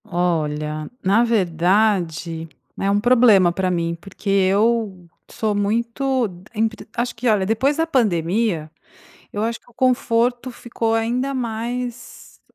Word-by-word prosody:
Olha, 155 -5 -2
na 200 +5 +4
verdade, 175 -5 +1 0.3
é 195 - 0
um 200 +1 +2
problema 225 -6 +5
pra 185 +1 -1
mim, 170 -1 -1
porque 195 +1 -7
eu 195 0 +1 0.2
sou 215 -1 -1
muito 235 +5 0
de 180 -2 -13
empre 220 +1 -2
Acho 240 0 -2
que, 240 +2 -3
olha, 205 -3 +2
depois 260 +8 +1
da 325 - +2
pandemia, 190 - 0 0.6
eu 205 - -3
acho 230 +1 -2
que - - -24
o - - -25
conforto 245 0 +1
ficou 230 -2 -2
ainda 245 +4 0
mais 240 0 -5
215 Hz, 135 wpm, -21 LUFS, 180-235 Hz, 0.6 s, problema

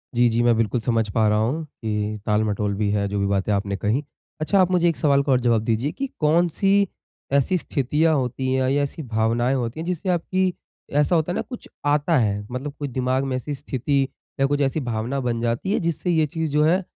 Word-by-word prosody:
जी, 120 0 +5
जी। 115 +1 +1
मैं 120 -1 +4
बिल्कुल 115 +1 +1
समझ 115 -2 0
पा 110 +1 +2
रहा 105 0 +3
हूँ 130 +9 0
कि 105 -5 -3
ताल-मटोल 105 -1 0
भी 105 0 0
है 100 -1 0
जो 100 0 -2
भी 100 - +1
बातें 100 +1 0
आपने 100 0 -1
कही। 110 +10 0 0.4
अच्छा 195 +5 +2
आप 185 0 +4
मुझे 175 -1 +3
एक 165 - -1
सवाल 140 -2 +3
का 140 - 0
और 125 - +4
जवाब 115 -2 +3
दीजिए 115 +6 0
कि 275 - -4
कौन-सी 175 +5 +3 0.5
ऐसी 140 +6 +3
स्थितियाँ 150 +1 +1
होती 130 0 -1
है 130 0 +1
या 145 0 +2
ऐसी 145 +2 -5
भावनाएँ 115 +2 +1
होती 120 +2 -3
है 165 - -4
जिससे 180 +1 -2
आपकी 185 +1 +1 0.4
ऐसा 150 +4 +3
होता 160 +2 +1
है - - -2
ना - - 0
कुछ 245 - -9 0.2
आता 145 +2 +2
है? 105 -4 +1
मतलब 135 +3 -4
कुछ 145 -1 -3
दिमाग़ 130 +1 0
में 135 -1 -2
ऐसी 145 +3 -4
स्थिति 140 0 -1 0.4
या 135 - +4
कुछ 145 +1 0
ऐसी 140 +3 +1
भावना 120 +1 -2
बन 120 -3 -1
जाती 120 +11 -1
है - - +2
जिससे 170 +1 -2
ये 160 -2 +3
चीज़ 160 +1 -3
जो 150 +1 +3
है 180 +5 +3
135 Hz, 225 wpm, -23 LUFS, 115-155 Hz, 0.5 s, जी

